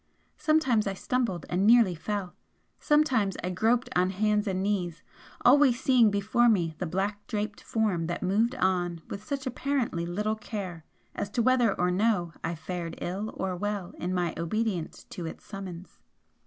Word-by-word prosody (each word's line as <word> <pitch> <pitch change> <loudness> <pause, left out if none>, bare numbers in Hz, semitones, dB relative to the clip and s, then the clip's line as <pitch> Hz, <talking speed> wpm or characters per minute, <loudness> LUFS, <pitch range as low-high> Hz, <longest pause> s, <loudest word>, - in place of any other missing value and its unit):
Sometimes 270 -9 +2
I 195 - -2
stumbled 225 - -1
and 185 +3 +1
nearly 230 -5 +6
fell 190 +2 -4 0.5
sometimes 260 -10 +2
I 180 - -1
groped 230 +6 +2
on 180 +1 +3
hands 210 +2 +1
and 190 -1 -1
knees, 180 -6 -1 0.4
always 260 -1 +6
seeing 250 -4 +5
before 215 +4 +3
me 175 -7 +2
the 180 - -2
black 200 +4 -2
draped 210 0 -3
Form 200 -7 0
that 175 - -3
moved 220 +7 +2
on 175 -4 0
with 200 - -5
such 280 0 -4
apparently 250 -9 -1
little 210 +5 -1
care 195 -6 -6 0.3
as 200 - -3
to 235 +3 0
whether 245 -4 +3
or 180 0 +2
no 180 -3 +1
I 170 - -2
fared 170 0 -5
ill 200 +5 -3
or 190 -1 -2
well 205 -1 -3
in 180 - -2
my 175 -2 0
obedience 180 +1 -2
to 170 -2 -5
its - - -9
summons. 190 -3 -8
200 Hz, 165 wpm, -28 LUFS, 180-225 Hz, 0.5 s, nearly